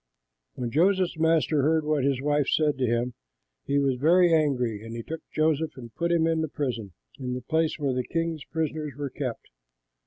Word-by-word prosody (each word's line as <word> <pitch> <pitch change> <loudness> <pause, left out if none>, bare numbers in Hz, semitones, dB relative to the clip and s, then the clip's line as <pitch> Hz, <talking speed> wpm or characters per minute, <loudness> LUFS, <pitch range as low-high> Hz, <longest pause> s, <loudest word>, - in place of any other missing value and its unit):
When 120 -2 -3
Joseph's 180 +2 +2
master 160 -2 +3
heard 155 +2 +2
what 150 -3 +1
his 135 -1 0
wife 145 -1 +2
said 150 -2 +2
to 125 - +2
him, 120 +2 0 0.5
he 140 - +1
was 135 -2 +2
very 170 +5 +5
angry; 125 -9 +1
and 115 +1 -7
he 115 - -5
took 160 +4 -6
Joseph 155 0 0
and 120 -3 -10
put 170 0 -1
him 165 -1 +3
into 165 -1 +1
the 160 -2 -3
prison, 115 -9 -3 0.3
in 125 -1 -3
the 125 - -4
place 160 +5 0
where 140 -4 0
the 125 0 -1
king's 165 0 -2
prisoners 155 -2 -3
were 145 -2 -4
kept. 130 -5 -5
150 Hz, 195 wpm, -26 LUFS, 125-160 Hz, 0.5 s, very